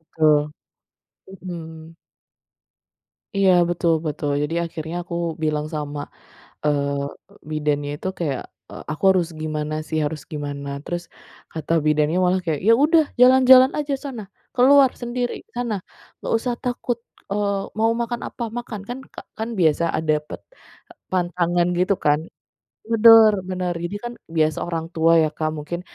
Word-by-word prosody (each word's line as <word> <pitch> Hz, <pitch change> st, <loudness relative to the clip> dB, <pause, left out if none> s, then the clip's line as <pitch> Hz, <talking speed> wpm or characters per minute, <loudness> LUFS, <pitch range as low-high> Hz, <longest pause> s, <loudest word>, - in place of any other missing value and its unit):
Betul. 150 Hz, -1 st, +3 dB, 0.8 s
Mhm. 165 Hz, -4 st, -9 dB, 1.4 s
Iya, 195 Hz, -1 st, +5 dB, 0.2 s
betul 175 Hz, -1 st, +1 dB
betul. 150 Hz, -1 st, -2 dB
Jadi, 150 Hz, +2 st, -2 dB
akhirnya 165 Hz, 0 st, -6 dB
aku 170 Hz, -, -6 dB, 0.3 s
bilang 150 Hz, -1 st, 0 dB
sama, 145 Hz, -1 st, -4 dB, 0.6 s
eee, 140 Hz, -1 st, 0 dB, 0.4 s
bidannya 150 Hz, -1 st, -1 dB
itu 185 Hz, -, -4 dB
kayak, 145 Hz, -7 st, -2 dB, 0.3 s
eee, -, -, -9 dB
"Aku 155 Hz, -, -8 dB
harus 180 Hz, -3 st, +2 dB
gimana 155 Hz, -1 st, -3 dB
sih? 160 Hz, +1 st, -1 dB
Harus 150 Hz, 0 st, -3 dB
gimana?" 145 Hz, -1 st, -5 dB, 0.2 s
Terus 175 Hz, 0 st, -3 dB, 0.5 s
kata 160 Hz, 0 st, -4 dB
bidannya 150 Hz, +2 st, +2 dB
malah 180 Hz, +1 st, +2 dB
kayak, 160 Hz, -4 st, -1 dB
"Ya -, -, +8 dB
udah 320 Hz, +1 st, +5 dB, 0.2 s
jalan-jalan 260 Hz, +1 st, +7 dB
aja 290 Hz, -1 st, -1 dB
sana, 255 Hz, -6 st, -5 dB, 0.3 s
keluar 265 Hz, +1 st, +6 dB
sendiri 245 Hz, 0 st, -2 dB, 0.2 s
sana, 240 Hz, -3 st, -1 dB, 0.5 s
nggak -, -, -3 dB
usah 245 Hz, +2 st, -2 dB
takut, 245 Hz, -1 st, -2 dB, 0.3 s
eee, 200 Hz, -1 st, 0 dB, 0.2 s
mau 225 Hz, +1 st, +3 dB
makan 235 Hz, 0 st, -2 dB
apa, -, -, -8 dB, 0.2 s
makan." 235 Hz, -3 st, -6 dB
kan 245 Hz, +2 st, -4 dB, 0.2 s
ka -, -, -7 dB, 0.2 s
kan 220 Hz, +1 st, -3 dB
biasa 160 Hz, 0 st, +3 dB
a -, -, 0 dB
dapet 150 Hz, 0 st, -2 dB, 0.7 s
pantangan 175 Hz, -1 st, +1 dB
gitu 185 Hz, +2 st, +3 dB
kan. 150 Hz, +1 st, +4 dB, 0.7 s
Bener 225 Hz, -1 st, +8 dB, 0.2 s
bener, 180 Hz, -1 st, -2 dB
jadi 175 Hz, +4 st, -3 dB
kan 240 Hz, -, -4 dB, 0.2 s
biasa 155 Hz, -1 st, +2 dB
orang 165 Hz, -1 st, -3 dB
tua 165 Hz, 0 st, +3 dB
ya 155 Hz, -, +2 dB
Kak 155 Hz, -1 st, -1 dB
mungkin 160 Hz, +4 st, -5 dB
170 Hz, 140 wpm, -22 LUFS, 150-225 Hz, 1.4 s, Ya